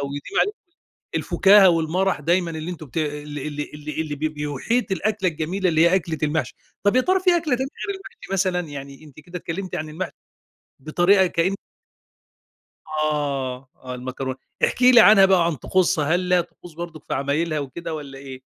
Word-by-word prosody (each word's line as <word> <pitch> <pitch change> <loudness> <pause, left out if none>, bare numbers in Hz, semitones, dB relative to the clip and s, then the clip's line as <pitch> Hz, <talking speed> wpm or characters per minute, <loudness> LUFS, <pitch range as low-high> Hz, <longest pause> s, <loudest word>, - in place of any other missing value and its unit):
ويديم 140 +1 -2
عليكم 420 +1 0 0.6
الفكاهة 195 0 +5
والمرح 170 +1 +1
دايمًا 170 +3 +1
اللي 160 +1 -5
أنتم 165 -3 -8
بت 135 - -18
اللي 150 -2 -3
اللي 150 0 -5
اللي 150 +1 -5
اللي 155 -2 -3
ب - - -12
بيحيط 155 - -1
الأكلة 205 0 0
الجميلة، 170 +5 -2
اللي 160 -2 +2
هي 170 +2 +5
أكلة 165 -4 -1
المحشي. 155 +1 -1 0.3
طَب 205 +4 +3
يا - - +6
ترى 370 +7 +2
في 365 0 +4
أكلة 315 -6 0
تانية 265 +2 -3 0.2
غير 400 - -2
المحشي 390 - -12
مثلًا؟ 185 -2 +1
يعني 140 -3 -9
أنتِ 150 -1 -14
كده 175 +4 -8
اتكلمتِ 185 +3 -5
عن 155 - -3
المحشي 160 +5 -5 0.7
بطريقة 175 +7 +3
كأن 175 +3 0 1.3
آه، 140 -4 -2
آه 130 -1 -8
المكرونة. 130 +1 -5 0.3
احكي 250 0 +4
لي 240 - +9
عنها 205 -3 +8
بقى 190 -1 +4
وعن 170 -1 +2
طقوسها، 180 +3 +1
هل 180 - +2
ليها 180 -1 +2
طقوس 175 0 -11
برضك 165 -2 -8
في - - -3
عمايلها 150 +4 -1
وكده 145 +4 -6
والّا 140 -3 -8
إيه؟ 135 -1 -9
165 Hz, 180 wpm, -23 LUFS, 150-190 Hz, 1.3 s, لي